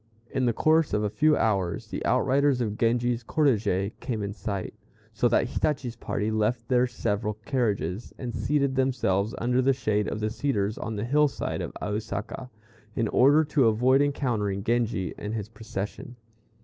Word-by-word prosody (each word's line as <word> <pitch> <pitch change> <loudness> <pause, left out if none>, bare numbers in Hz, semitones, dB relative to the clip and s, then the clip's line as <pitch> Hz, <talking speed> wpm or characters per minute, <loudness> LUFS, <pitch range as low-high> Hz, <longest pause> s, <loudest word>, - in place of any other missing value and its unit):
In 130 -2 0
the - - +4
course 155 +4 +2
of 105 0 +1
a 105 - -1
few 155 +3 +3
hours 95 -6 0
the - - -4
outriders 140 -1 +3
of 110 -4 -1
Genji's 120 +1 +1
cortège 110 -9 +1
came 110 -4 -3
in 100 0 -3
sight; 100 -3 -4 0.4
so - - +2
that - - +2
Hitachi's 135 -6 -1
party 110 -1 -2
left 115 +2 0
their 125 0 +3
several 105 -3 -2
carriages, 105 - -1
and 120 -2 -5
seated 140 -2 +1
themselves 120 -5 +1
under 125 +2 +1
the 135 +1 +3
shade 105 -5 0
of - - -3
the 110 0 -1
cedars 110 -5 -1
on 110 0 -4
the 105 +2 -2
hill 150 +4 +4
side 135 - -4
of - - -4
Ausaka, 105 +4 -4 0.5
in 115 -2 0
order 145 +5 +5
to 145 -4 +2
avoid 125 +5 +4
encountering 115 -9 0
Genji 115 -5 0
and 105 +2 -4
his 105 -2 -4
procession. 110 +1 -6
115 Hz, 170 wpm, -27 LUFS, 105-130 Hz, 0.5 s, order